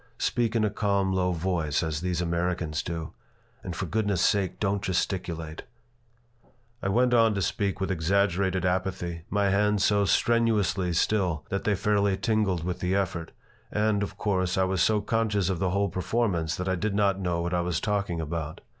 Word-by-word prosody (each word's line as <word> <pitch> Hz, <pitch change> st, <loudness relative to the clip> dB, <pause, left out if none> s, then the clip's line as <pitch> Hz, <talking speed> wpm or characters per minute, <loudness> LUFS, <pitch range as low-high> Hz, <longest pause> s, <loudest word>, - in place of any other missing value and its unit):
"Speak 120 Hz, -2 st, 0 dB
in 115 Hz, -, +2 dB
a 105 Hz, -, 0 dB
calm, 100 Hz, -2 st, +1 dB
low 90 Hz, -1 st, +1 dB
voice, 85 Hz, -3 st, -1 dB
as 80 Hz, -1 st, -2 dB
these 90 Hz, -1 st, -1 dB
Americans 85 Hz, -2 st, -1 dB
do. 85 Hz, -2 st, -5 dB, 0.5 s
And 90 Hz, -, -5 dB
for 95 Hz, -, -3 dB
goodness' 100 Hz, -1 st, 0 dB
sake 100 Hz, -4 st, +1 dB
don't 100 Hz, -1 st, 0 dB
gesticulate!" 85 Hz, -4 st, -2 dB, 1.2 s
I 95 Hz, -, -1 dB
went 125 Hz, +4 st, +3 dB
on 115 Hz, -2 st, +4 dB
to 100 Hz, -, -1 dB
speak 100 Hz, 0 st, -1 dB
with 95 Hz, 0 st, -1 dB
exaggerated 95 Hz, +1 st, +1 dB
apathy, 90 Hz, -2 st, -2 dB
my 100 Hz, 0 st, +1 dB
hands 105 Hz, 0 st, +2 dB
so 100 Hz, -1 st, +3 dB
strenuously 100 Hz, -5 st, +2 dB
still 90 Hz, -3 st, +1 dB
that 100 Hz, -, -2 dB
they 105 Hz, -, +2 dB
fairly 100 Hz, 0 st, +1 dB
tingled 105 Hz, -7 st, 0 dB
with 90 Hz, 0 st, -3 dB
the 90 Hz, +1 st, 0 dB
effort, 85 Hz, -4 st, -2 dB, 0.4 s
and, 105 Hz, -1 st, +1 dB
of 100 Hz, -, -4 dB
course, 95 Hz, -3 st, 0 dB
I 95 Hz, -, +3 dB
was 95 Hz, -1 st, 0 dB
so 110 Hz, -1 st, +3 dB
conscious 105 Hz, -3 st, 0 dB
of 90 Hz, -, -2 dB
the 95 Hz, -, +1 dB
whole 100 Hz, +2 st, +1 dB
performance 90 Hz, -3 st, -1 dB
that 90 Hz, -, -4 dB
I 95 Hz, -, +1 dB
did 100 Hz, +3 st, -1 dB
not 100 Hz, -2 st, +2 dB
know 85 Hz, -2 st, -1 dB
what 85 Hz, +1 st, -2 dB
I 90 Hz, -, +2 dB
was 85 Hz, -3 st, -1 dB
talking 100 Hz, -5 st, -1 dB
about. 80 Hz, -1 st, -4 dB
95 Hz, 180 wpm, -27 LUFS, 85-100 Hz, 1.2 s, on